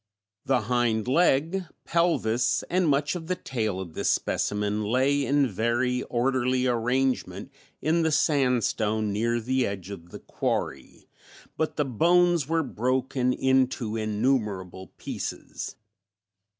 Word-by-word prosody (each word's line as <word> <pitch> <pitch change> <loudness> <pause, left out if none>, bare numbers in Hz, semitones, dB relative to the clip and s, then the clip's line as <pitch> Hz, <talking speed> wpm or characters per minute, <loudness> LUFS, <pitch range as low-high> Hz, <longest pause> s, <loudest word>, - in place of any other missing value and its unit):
The 130 -2 +2
hind 115 -1 0
leg, 165 +5 +2 0.2
pelvis 165 -9 +1
and 180 -2 +2
much 145 +1 +1
of 170 -3 -6
the 185 - 0
tail 110 - -3
of 90 -4 -7
this - - -1
specimen 105 +1 0
lay 130 +6 +2
in 140 0 +3
very 120 +4 0
orderly 130 +1 0
arrangement 125 -3 0 0.3
in 160 +3 +2
the 160 -1 +1
sandstone 120 -8 +1
near 115 +3 0
the 130 +2 0
edge 100 -1 -6
of 85 -3 -9
the - - -8
quarry, - - -4 0.5
but 160 - -2
the 150 - 0
bones 170 +4 +3
were 165 0 +1
broken 130 0 0
into 130 -4 +1
innumerable 105 -5 -1
pieces. - - -6
125 Hz, 125 wpm, -26 LUFS, 110-140 Hz, 0.5 s, in